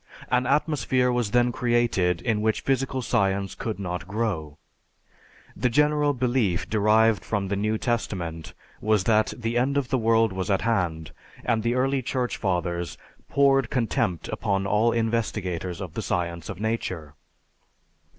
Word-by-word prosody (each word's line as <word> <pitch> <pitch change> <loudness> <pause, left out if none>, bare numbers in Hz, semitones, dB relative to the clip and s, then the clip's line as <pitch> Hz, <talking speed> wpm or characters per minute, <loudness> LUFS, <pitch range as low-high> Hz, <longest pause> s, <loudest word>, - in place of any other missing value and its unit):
An 125 0 +2
atmosphere 130 -3 +2
was 120 -3 0
then 120 +2 +3
created 120 -8 +1
in 110 -3 0
which 110 0 +1
physical 135 -1 0
science 100 -2 0
could 110 -2 -4
not 90 -2 -4
grow. 95 -9 -2 1.0
The 125 - +1
general 150 +3 +3
belief 120 -8 0
derived 110 +1 +3
from 100 -3 -2
the 100 - 0
New 105 +2 0
Testament 90 - -3 0.3
was 105 -2 +2
that 110 0 +3
the 120 0 -1
end 140 +3 +1
of 135 -3 -1
the 130 - +1
world 115 -2 +3
was 95 0 -3
at 95 - +2
hand, 90 -8 -1 0.3
and 110 -1 +1
the 120 +2 0
early 135 +1 +1
Church 125 0 -2
Fathers 85 -3 -2 0.3
poured 135 -3 +3
contempt 105 -8 -1
upon 100 -1 -1
all 105 +4 +3
investigators 100 -6 -2
of 90 -5 -6
the - - -3
science 85 -1 -2
of 100 -2 -6
nature. 95 -9 -3
110 Hz, 150 wpm, -25 LUFS, 95-120 Hz, 1.0 s, then